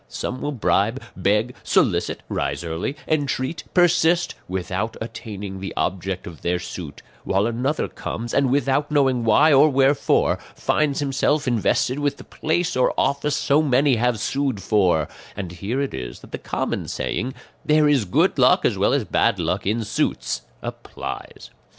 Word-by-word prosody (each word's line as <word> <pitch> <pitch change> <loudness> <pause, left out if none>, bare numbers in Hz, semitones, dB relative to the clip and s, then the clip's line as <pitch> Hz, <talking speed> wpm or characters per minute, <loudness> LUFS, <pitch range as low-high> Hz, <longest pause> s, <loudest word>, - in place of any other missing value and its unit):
Some 125 +1 -4
will 145 - -2
bribe, 115 -2 +1 0.2
beg, 105 +6 +1
solicit, - - +1
rise - - -2
early, 85 - -3
entreat, 145 -1 -1
persist, 175 -1 +3
without 95 +4 -3
attaining 100 -4 -6
the 95 0 -6
object 95 0 -2
of 85 -2 -10
their 90 +1 0
suit; 85 -4 -8 0.2
while 95 +2 +1
another 125 +6 -1
comes, 115 +1 -5
and 140 -2 +3
without 140 +2 +1
knowing 135 -5 +2
why 145 +8 +5
or 145 +3 +6
wherefore, 135 +1 +2 0.2
finds 150 -2 0
himself 145 +1 +1
invested 125 +3 +1
with 145 -1 0
the - - -11
place 165 +2 -1
or 125 - +2
office 140 +1 +1
so 145 +1 +3
many 135 -2 +3
have 120 -1 +1
sued 135 -1 -1
for; 90 -8 +2 0.3
and 95 -4 -4
here 100 +9 -3
it 140 -1 -2
is - - -6
that - - -15
the - - -5
common - - -3
saying, 125 +4 -3 0.3
'There 150 0 +4
is 140 -7 +3
good 90 - +2
luck - - +5
as - - +1
well - - +3
as - - +2
bad - - +2
luck - - -2
in 110 +3 0
suits,' 85 - -1 0.2
applies. - - -7
125 Hz, 160 wpm, -22 LUFS, 100-145 Hz, 0.3 s, or